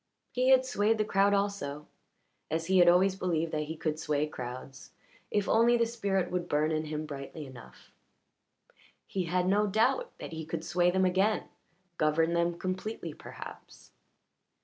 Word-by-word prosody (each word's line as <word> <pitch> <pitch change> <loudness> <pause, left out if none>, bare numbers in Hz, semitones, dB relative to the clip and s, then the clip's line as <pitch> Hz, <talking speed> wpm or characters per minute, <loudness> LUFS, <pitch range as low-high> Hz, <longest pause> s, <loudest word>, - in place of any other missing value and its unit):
He 255 +1 +1
had 260 -1 +6
swayed 225 -3 +1
the 215 - +1
crowd 200 0 +3
also 200 -8 -1 0.6
as 160 +1 -1
he 185 +1 +3
had 175 -1 +7
always 185 +2 +4
believed 165 -4 -1
that 150 0 -1
he 160 +2 -6
could 155 -1 -2
sway 150 -1 0
crowds 130 -1 -8 0.4
if 205 -1 0
only 235 +2 +4
the 235 - +3
spirit 200 -6 -1
would 180 -1 -2
burn 150 +2 +2
in 155 0 -1
him 155 0 -4
brightly 145 +1 -7
enough; 130 -3 -14 1.1
he 185 -2 -2
had 180 +2 0
no 205 +2 +3
doubt 225 - +2
that - - -7
he 160 0 -5
could 160 +1 -5
sway 175 +1 +2
them 190 +1 +2
again, 190 +4 +2 0.6
govern 160 +2 +2
them 170 0 +1
completely 185 +5 -4
perhaps. - - -11
180 Hz, 165 wpm, -30 LUFS, 155-200 Hz, 1.1 s, had